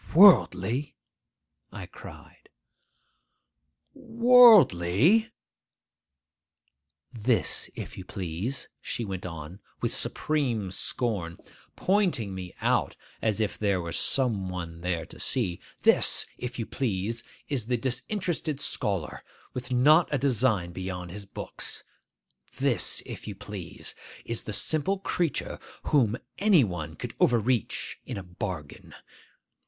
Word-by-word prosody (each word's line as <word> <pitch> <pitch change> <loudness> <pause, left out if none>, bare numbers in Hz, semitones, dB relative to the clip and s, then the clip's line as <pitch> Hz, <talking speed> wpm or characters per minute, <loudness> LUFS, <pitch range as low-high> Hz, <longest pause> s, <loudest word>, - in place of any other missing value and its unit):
'Worldly?' 140 - +5 0.8
I - - -7
cried. - - -14 1.4
'Worldly?' 225 - +5 1.8
'This, 115 +1 +1
if - - -7
you - - -7
please,'—she 95 +7 -4
went 95 -2 -5
on 85 +2 -8 0.2
with - - -1
supreme 125 -11 -2
scorn, 95 -5 -3 0.4
pointing 180 - +1
me 90 -1 -7
out - - +1 0.3
as 110 -1 0
if 105 -2 -2
there 100 -3 +1
were 85 -1 -5
some 110 -7 +2
one 85 -2 -6
there 90 -2 -2
to - - -14
see,—'this, 95 -9 +2
if 125 0 -6
you 115 - -3
please, 115 -2 -2 0.2
is 130 -7 -2
the 125 0 +1
disinterested 155 - -1
scholar, 95 - -3 0.3
with 125 0 -6
not 150 +7 +5
a 145 - +2
design 120 -9 +1
beyond 90 -1 -6
his 100 +1 -7
books! - - -7 0.7
This, - - +3
if - - -8
you 105 - -5
please, 100 -4 -8 0.3
is 115 -1 -3
the - - -4
simple 155 - 0
creature 175 -5 -2 0.3
whom 120 -6 +3 0.2
any 195 -7 +5
one 85 -6 -4
could - - -7
overreach 120 0 +1
in - - -6
a 100 - -6
bargain! 90 -4 -7
110 Hz, 110 wpm, -27 LUFS, 90-140 Hz, 1.8 s, Worldly